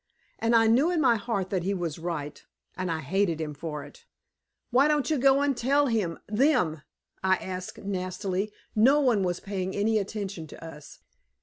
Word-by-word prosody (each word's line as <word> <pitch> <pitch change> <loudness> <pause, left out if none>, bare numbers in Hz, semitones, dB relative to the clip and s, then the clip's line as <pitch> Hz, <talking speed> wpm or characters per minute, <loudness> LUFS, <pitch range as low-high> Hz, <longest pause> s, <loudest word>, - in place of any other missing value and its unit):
And 230 +1 +2
I 225 0 +6
knew 250 +9 +4
in 355 -2 +1
my 255 -6 +4
heart 200 -4 -2
that 190 -3 0
he 195 +3 -1
was 170 -4 -3
right, 160 -4 -5 0.3
and 185 -1 -3
I 160 -1 -2
hated 170 +2 0
him 155 -2 -3
for 150 0 -5
it. 475 -1 -15 0.6
"Why 265 +4 +5
don't 300 0 +1
you 300 - +2
go 275 +2 +5
and 285 -1 +1
tell 280 +5 +2
him 215 -10 0
them?" 210 - +2 0.4
I 190 0 +4
asked 185 0 -6
nastily. 190 +1 -3 0.2
No 260 +7 +5
one 245 -8 +3
was 180 -1 -1
paying 190 -2 -4
any 215 +2 +2
attention 195 -5 -5
to 165 - -11
us. 150 -3 -11
200 Hz, 185 wpm, -27 LUFS, 175-245 Hz, 0.6 s, I